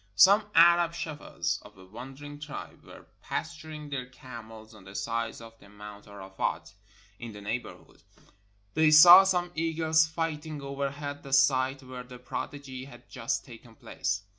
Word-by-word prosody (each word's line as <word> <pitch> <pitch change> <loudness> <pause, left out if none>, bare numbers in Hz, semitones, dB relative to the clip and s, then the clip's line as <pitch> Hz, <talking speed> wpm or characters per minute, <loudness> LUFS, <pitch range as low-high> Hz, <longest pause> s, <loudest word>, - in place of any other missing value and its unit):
Some 200 - +6
Arab 170 0 +6
shepherds 160 -3 -3
of 105 -1 -16
a 95 - -14
wandering 135 +8 -10
tribe 145 -1 -9
were - - -14 0.2
pas 170 - -4
turing 155 -2 -10
their 130 -3 -4
camels 115 -3 -12
on 105 -3 -15
the 95 +1 -12
sides 115 +2 -3
of 115 0 -14
Mount 105 0 -12
Arafat, 95 -2 -5 0.5
in 120 -2 -8
the 105 - -10
neighborhood. 110 +3 -6 0.7
They 155 0 +4
saw 175 +5 +10
some 180 -2 0
eagles 160 -1 +2
fighting 155 -1 -4
overhead 140 +1 -5
the 135 - -11
site 135 0 +3
where 130 -1 -8
the 125 0 -12
prodigy 130 +1 -7
had 120 -3 -15
just - - -3
taken - - -14
place. 100 +2 -3
135 Hz, 150 wpm, -28 LUFS, 115-155 Hz, 0.7 s, saw